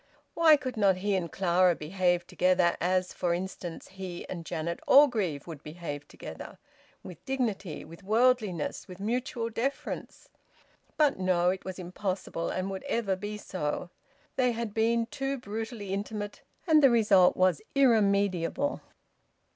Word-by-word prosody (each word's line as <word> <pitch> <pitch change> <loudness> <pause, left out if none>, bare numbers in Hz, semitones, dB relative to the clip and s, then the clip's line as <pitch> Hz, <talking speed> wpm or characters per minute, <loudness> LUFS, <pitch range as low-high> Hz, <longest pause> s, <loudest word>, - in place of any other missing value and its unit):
Why 320 -2 +6
could 255 -4 -5
not 200 -3 +4
he 200 +1 0
and 170 -4 -2
Clara 180 -1 +3
behave 175 +2 0
together 180 -1 +2
as, 185 +1 +1
for 170 -1 0
instance, 180 -2 -6
he 190 -2 -7
and 170 -3 -7
Janet 170 +2 -3
Orgreave 215 - +4
would 160 -4 -8
behave 150 -2 -7
together, - - -9 0.5
with 180 -4 -11
dignity, 220 - -2
with 170 +3 -13
worldliness, 215 -5 +1
with 180 0 -10
mutual 235 +2 -2
deference? 260 +5 -4 0.7
But 295 -8 +3
no! 180 -1 +2
It 190 - -6
was 190 -1 -5
impossible, 185 -1 -3
and 185 +1 -2
would 190 - -5
ever 205 -5 0
be 205 +2 -5
so. 175 -3 -4 0.5
They 250 -2 +3
had 230 -2 -4
been 230 +1 +2
too 270 +3 -3
brutally 220 -3 -5
intimate, 205 +1 -4 0.2
and 315 -3 +5
the 275 - +7
result 210 -6 +5
was 185 -3 +3
irremediable. 205 - +2
195 Hz, 140 wpm, -29 LUFS, 180-230 Hz, 0.7 s, the